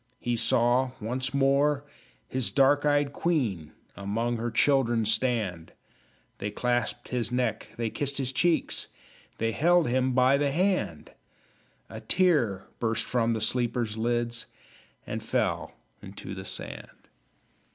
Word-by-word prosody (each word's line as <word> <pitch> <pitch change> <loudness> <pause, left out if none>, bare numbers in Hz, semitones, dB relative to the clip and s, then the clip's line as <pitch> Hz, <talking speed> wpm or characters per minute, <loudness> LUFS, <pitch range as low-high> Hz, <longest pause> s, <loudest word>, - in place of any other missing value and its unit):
He 120 0 -1
saw 120 +2 +2
once 125 +4 -2
more 140 +1 +2 0.4
his 130 -2 0
dark 145 +2 +3
eyed 145 -1 +2
queen 120 - -1 0.2
Among 115 +4 -2
her 120 +1 -2
children 120 -2 +2
stand; 110 -7 0 0.7
They 100 - -2
clasped 120 +2 -1
his 120 -2 -1
neck, 125 0 -1
they 115 -2 -2
kissed 140 -1 -2
his 130 -2 -1
cheeks, 170 +5 +1 0.5
They 115 0 0
held 170 +7 +3
him 130 +1 +1
by 130 +2 +4
the 145 -1 +2
hand! 185 +5 0 0.8
A - - -8
tear 145 - +2
burst 115 0 0
from 115 -2 +1
the 110 - -2
sleeper's 120 -1 0
lids 120 +1 -1 0.6
And - - -4
fell - - -1 0.3
into - - -8
the - - -7
sand. - - -7
125 Hz, 130 wpm, -28 LUFS, 115-140 Hz, 0.8 s, by